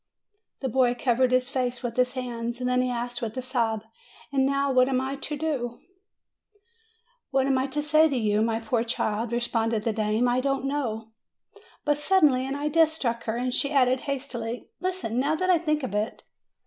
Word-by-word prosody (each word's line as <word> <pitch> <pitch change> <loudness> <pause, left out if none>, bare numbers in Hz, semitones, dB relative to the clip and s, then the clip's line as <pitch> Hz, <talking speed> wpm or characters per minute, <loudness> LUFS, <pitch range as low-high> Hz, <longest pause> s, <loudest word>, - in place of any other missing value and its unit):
The 265 - -1
boy 245 0 +2
covered 250 +1 +2
his 255 +1 +2
face 250 -2 -2
with 235 -2 -3
his 250 0 +2
hands; 240 -2 -4
then 250 0 +1
he 255 - 0
asked 245 0 -3
with 225 +1 -4
a - - -1
sob, 230 -4 -1 0.5
"And 265 -1 +3
now 275 0 +1
what 255 0 +4
am 260 -1 +2
I 265 +1 -2
to 295 +2 -4
do 270 -6 -2 0.7
!" 455 +3 -40
"What 270 -1 +2
am 270 -1 +2
I 260 - 0
to 295 +2 -2
say 310 +1 +4
to 275 - -1
you, 210 -2 +1
my 225 0 +1
poor 225 +1 0
child?" 225 -1 -1
re 235 - +1
sponded 225 -2 0
the 225 - 0
dame: 215 +2 +1
"I 245 +1 +2
don't 275 0 -1
know." 225 -6 -2 0.7
But 295 -1 +2
suddenly 295 -7 +3
an 270 - -3
idea 300 +3 +3
struck 250 -7 -2
her, 225 +1 -1
and 250 +1 -1
she 280 +2 +1
added 260 -2 +3
hastily: 245 -4 -4
"Listen, 360 -10 -2
now 290 +4 +1
that 370 +3 +1
I 345 - +4
think 305 -3 0
of 230 - -3
it. 210 +2 -2
255 Hz, 200 wpm, -26 LUFS, 235-285 Hz, 0.7 s, what